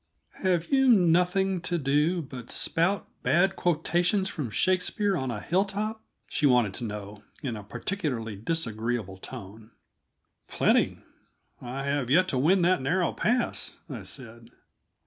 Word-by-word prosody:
"Have 180 -3 +1
you 270 -1 +4
nothing 180 -1 +3
to 175 0 -1
do 150 +4 +1
but 130 -4 -9
spout 175 +3 0
bad 190 +2 +3
quotations 175 +3 +1
from 145 -8 -4
Shakespeare 185 - +1
on 130 -6 -2
a 110 -3 -3
hilltop?" 200 - -1 0.3
she 150 - +1
wanted 120 -6 +3
to 120 - -4
know, 105 -1 -7 0.2
in 125 -5 -2
a 105 - -7
particularly 120 - -3
disagreeable 115 - -3
tone. 105 +4 -9 0.8
"Plenty; - - +2 0.6
I 130 +3 -5
have 140 -3 -1
yet 180 +7 +4
to 130 - 0
win 175 +7 +4
that 180 -1 +3
narrow 175 +6 +1
pass," 245 +2 0
I 120 -5 -5
said. 115 +5 -6
155 Hz, 135 wpm, -27 LUFS, 115-185 Hz, 0.8 s, you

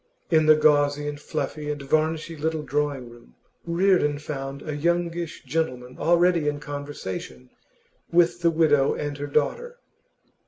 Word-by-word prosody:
In 155 -1 +4
the 155 - +8
gauzy 145 -1 +3
and 145 0 -5
fluffy 150 0 -4
and 145 0 -3
varnishy 155 +3 0
little 160 0 -2
drawing 140 -3 -2
room 120 - -17 0.3
Reardon 170 -4 +2
found 140 -2 -6
a 150 -2 -4
youngish 170 +1 -1
gentleman 130 -4 -3
already 170 -2 +3
in 145 0 -1
conversation 145 - -7 0.6
with 175 0 +3
the 170 - +4
widow 155 -4 +3
and 145 -1 -3
her 145 - -3
daughter. 480 - -1
150 Hz, 135 wpm, -25 LUFS, 145-165 Hz, 0.6 s, the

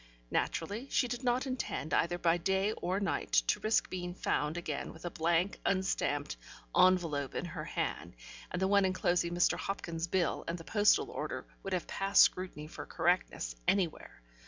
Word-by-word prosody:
Naturally, 210 +11 -2
she 250 - +2
did 245 +1 -4
not 250 +2 +1
intend, 255 -10 -3
either 175 +1 +2
by 170 -1 +2
day 190 +3 +1
or 190 -2 -2
night, 200 - -2
to - - +1
risk 215 +1 +2
being 180 -1 -5
found 150 -2 -1
again 155 -4 -4
with 160 - -12
a 175 - -3
blank 170 +3 +1
unstamped 145 - 0 0.4
envelope 165 -7 +3
in - - -2
her - - -6
hand, - - -3 0.3
and 180 - -3
the 190 - +2
one 200 0 +4
enclosing 175 -2 +1
Mr. 175 - +3
Hopkins's 170 -4 -3
bill 175 -1 0
and 170 - -2
the 165 - -10
postal 225 - +3
order - - -4 0.2
would 195 - -4
have 180 - -1
passed 195 +1 +5
scrutiny 180 -5 -1
for 155 - -9
correctness, 165 - 0
anywhere. 175 - -1
180 Hz, 170 wpm, -32 LUFS, 165-195 Hz, 0.4 s, passed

